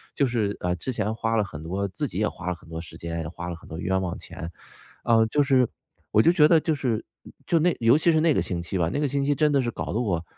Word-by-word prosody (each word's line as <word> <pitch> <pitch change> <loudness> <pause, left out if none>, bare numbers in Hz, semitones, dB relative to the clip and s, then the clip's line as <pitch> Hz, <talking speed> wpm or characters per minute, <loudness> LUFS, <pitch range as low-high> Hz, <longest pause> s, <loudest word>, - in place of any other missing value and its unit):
就 140 - +2
是， 110 -4 -1
嗯， 90 0 0
之 130 - -3
前 110 -1 -1
花 115 0 -1
了 105 - +3
很 80 -6 -8
多 95 +4 -2
自 95 - -3
己 - - -4
也 - - +2
花 - - -9
了 90 - 0
很 80 0 -18
多 80 - -5
时 85 - -11
间， 85 0 -4
也 80 - -5
花 85 +1 -6
了 85 - -4
很 80 - -15
多 80 - -6
冤 95 +1 0
枉 90 -2 -3
钱。 80 +1 -8 0.5
呃， 115 -1 +4
就 145 +6 +1
是 130 -3 +3 0.4
我 110 - +5
就 170 - +5
觉 150 -4 +6
得 165 0 +5
就 155 0 0
是 120 -6 -1 0.4
就 170 - +3
那 175 +2 +2
尤 115 +4 +5
其 170 +2 +3
是 155 -1 +3
那 165 -1 +4
个 - - +1
星 85 -2 -3
期 85 +3 -3
吧， 85 -1 +1
那 - - 0
个 145 - +1
星 140 +1 -1
期 145 - +3
真 150 0 +3
的 140 - +3
是 120 -2 -2
搞 - - -5
得 110 - 0
我， 95 -9 -1
110 Hz, 320 characters per minute, -25 LUFS, 90-140 Hz, 0.5 s, 觉